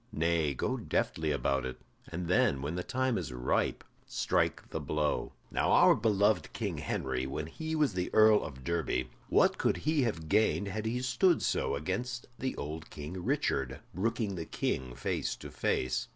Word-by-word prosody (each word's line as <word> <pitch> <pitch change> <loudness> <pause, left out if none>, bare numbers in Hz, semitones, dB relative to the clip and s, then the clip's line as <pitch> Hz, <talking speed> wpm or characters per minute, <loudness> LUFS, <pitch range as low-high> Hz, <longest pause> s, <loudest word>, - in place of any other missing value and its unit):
Nay, 80 -6 +1
go - - -1
deftly 80 -1 -1
about 70 -1 +1
it, 65 -1 -4 0.3
and 85 +1 -4
then, 70 -6 +3
when 75 +3 -2
the 90 - -2
time 130 +2 0
is 85 - -5
ripe, 60 0 0 0.2
strike - - 0
the - - -2
blow. 75 -1 -1 0.2
Now - - +1
our - - +7
beloved 105 -1 +2
King - - -3
Henry, 65 -1 -2
when 75 +3 -3
he 160 - -4
was 150 -7 +2
the 90 -1 -2
Earl 110 -1 +6
of 65 -3 -8
Derby, 80 -6 -1 0.2
what - - +4
could - - +2
he 155 0 +1
have 95 -11 -1
gained 105 +1 +2
had 110 +2 -3
he 125 +3 -1
stood 130 +8 +3
so - - +1
against 120 - -3
the 130 0 -2
old 80 +2 -6
King 80 +5 -6
Richard, 65 -5 0
brooking 105 +2 -1
the 85 -3 -4
King 65 -5 -2
face - - -2
to - - -10
face? 65 0 0
85 Hz, 175 wpm, -31 LUFS, 70-110 Hz, 0.3 s, our